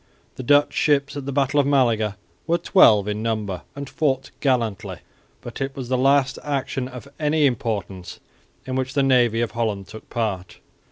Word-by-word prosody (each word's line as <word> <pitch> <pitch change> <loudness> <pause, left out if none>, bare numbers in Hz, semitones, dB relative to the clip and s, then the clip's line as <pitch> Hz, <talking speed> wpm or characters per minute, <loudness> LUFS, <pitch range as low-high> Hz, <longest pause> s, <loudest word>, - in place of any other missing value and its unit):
The - - -6
Dutch 145 +3 +3
ships 140 -1 +1
at 140 -1 -6
the - - -2
battle 140 +1 +1
of 140 - +2
Malaga 115 -7 +2 0.3
were 170 +1 +2
twelve 110 - +5
in 105 0 -2
number 105 -5 -2
and 140 0 -6
fought 135 -4 -1
gallantly, 120 -7 -1 0.4
but - - -9
it 135 0 -3
was 130 -3 -6
the 130 - +1
last 135 +1 +2
action 135 -2 -3
of 130 +1 -10
any 150 0 +2
importance 105 -8 -3 0.5
in 130 - -4
which 130 0 -2
the 140 - +3
navy 120 -4 +3
of 120 - -1
Holland 110 -4 -2
took 110 0 -12
part. 100 -6 -3
130 Hz, 175 wpm, -22 LUFS, 110-140 Hz, 0.5 s, twelve